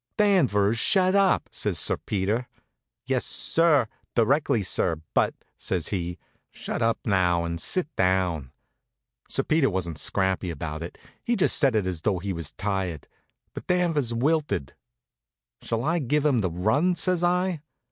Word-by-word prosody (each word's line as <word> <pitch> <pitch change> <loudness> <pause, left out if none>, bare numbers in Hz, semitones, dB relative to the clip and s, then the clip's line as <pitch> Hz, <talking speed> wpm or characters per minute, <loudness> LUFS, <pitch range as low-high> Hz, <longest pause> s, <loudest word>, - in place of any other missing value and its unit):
"Danvers, 120 - +3
shut 185 - +3
up!" 195 -2 +3
says - - -2
Sir - - +2
Peter. 105 +5 -2 0.6
"Yes, - - 0
sir; 160 -6 +3 0.3
directly, 120 -1 +2
sir; 90 -2 0 0.2
but - - +2
" - - -45
says 90 -4 -2
he. 90 -3 -3 0.3
"Shut - - -5
up 115 0 +2
now 90 -5 +2
and 85 0 -4
sit 185 -5 +1
down!" 90 -7 0 0.8
Sir - - +1
Peter 155 -3 +2
wasn't 85 -5 -3
scrappy 95 -1 0
about 75 -1 -5
it. 85 - -7 0.3
He 240 -1 0
just 195 - +3
said 135 -6 +3
it 105 -3 +1
as 90 -4 -3
though 100 0 0
he 95 +2 -4
was 85 -3 -4
tired. 95 -6 -3 0.5
But - - -9
Danvers 165 -8 +1
wilted. 120 - 0 0.9
"Shall 115 0 -2
I 165 +4 +1
give 150 +2 0
'em 140 -5 +3
the 95 -4 0
run?" 110 - +1
says 175 0 0
I. 180 -2 +1
110 Hz, 155 wpm, -25 LUFS, -, 0.9 s, Danvers